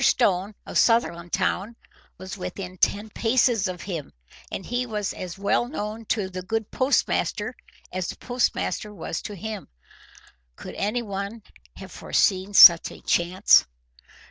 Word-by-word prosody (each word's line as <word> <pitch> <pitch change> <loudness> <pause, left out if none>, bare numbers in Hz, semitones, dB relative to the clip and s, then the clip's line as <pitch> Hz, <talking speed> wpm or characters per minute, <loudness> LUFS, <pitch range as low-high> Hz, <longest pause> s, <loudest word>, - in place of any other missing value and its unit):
Stone 200 -5 +2
of - - -3
Sutherlandtown 190 0 +1 0.4
was 185 +2 -7
within 185 0 -6
ten 210 +2 +1
paces 230 -3 +2
of 180 -1 -6
him, 170 -7 -5 0.4
and 190 - -5
he 245 +1 -1
was 210 -3 -3
as 180 -1 -7
well 200 +4 +1
known 225 -4 -5
to 210 -3 -1
the 185 0 -6
good 220 +3 -3
postmaster 260 +2 0 0.4
as 185 -1 -2
the - - -6
postmaster 245 -3 -1
was 165 -4 -5
to 205 - -7
him. 215 +1 -6 0.9
Could - - -9
anyone 205 0 -3 0.3
have - - -11
foreseen 195 +1 0
such 170 -3 +9
a - - -13
chance! 180 - +4
200 Hz, 135 wpm, -24 LUFS, 185-225 Hz, 0.9 s, such